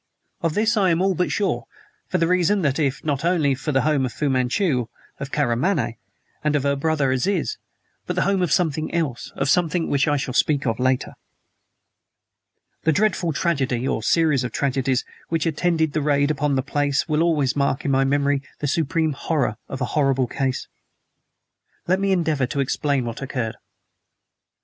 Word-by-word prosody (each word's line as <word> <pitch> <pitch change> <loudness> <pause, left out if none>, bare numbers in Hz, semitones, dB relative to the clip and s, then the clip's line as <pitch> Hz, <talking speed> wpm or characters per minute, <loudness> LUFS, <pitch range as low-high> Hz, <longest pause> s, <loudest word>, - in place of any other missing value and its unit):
Of 165 -2 -1
this 215 +1 +2
I 195 -3 +3
am 165 -1 +2
all 190 +1 +2
but 180 +1 -1
sure; 120 - -1 0.4
for 185 - 0
the 165 - +2
reason 180 +3 +2
that 140 0 +1
it 145 +1 -1
not 145 -1 -1
only 165 -5 +2
was 135 +1 -3
the 140 -4 +2
home 150 -3 +2
of 130 - -1
Fu 145 +3 -1
Manchu, 130 - +1 0.3
of 140 0 -6
Karamaneh, 135 0 0 0.5
and 150 -1 +1
of 145 - +1
her 140 0 +2
brother, 145 -2 +1
Aziz, 195 - 0 0.5
but - - -2
the - - +2
home 195 -1 +1
of 175 -4 0
something 155 -3 +1
else 150 -8 -2
of 140 - -1
something 170 +2 +2
which 140 0 +2
I 145 -1 +2
shall 135 -2 -3
speak 145 +2 +2
of 115 -1 -1
later. 130 0 0 1.7
The 160 - +2
dreadful 180 -1 +1
tragedy 135 -6 0
(or 110 - -1
series 150 +1 +2
of 125 - -3
tragedies) 135 -2 0 0.2
which 165 -1 0
attended 160 -1 +1
the 155 - 0
raid 145 0 +2
upon 145 -1 0
the 130 - 0
place 145 0 0
will 155 0 +1
always 155 -6 +2
mark 140 0 0
in 140 - +1
my 135 0 +3
memory 140 0 +1 0.2
the - - -4
supreme 160 +2 +1
horror 140 -6 -1
of 135 - -6
a - - +2
horrible 135 -3 +2
case. 130 +1 -2 1.2
Let 185 +2 +2
me 195 0 +1
endeavor 160 -8 +1
to 140 - -3
explain 140 -1 0
what 115 +1 -5
occurred. 120 -5 -3
145 Hz, 185 wpm, -22 LUFS, 135-165 Hz, 1.7 s, I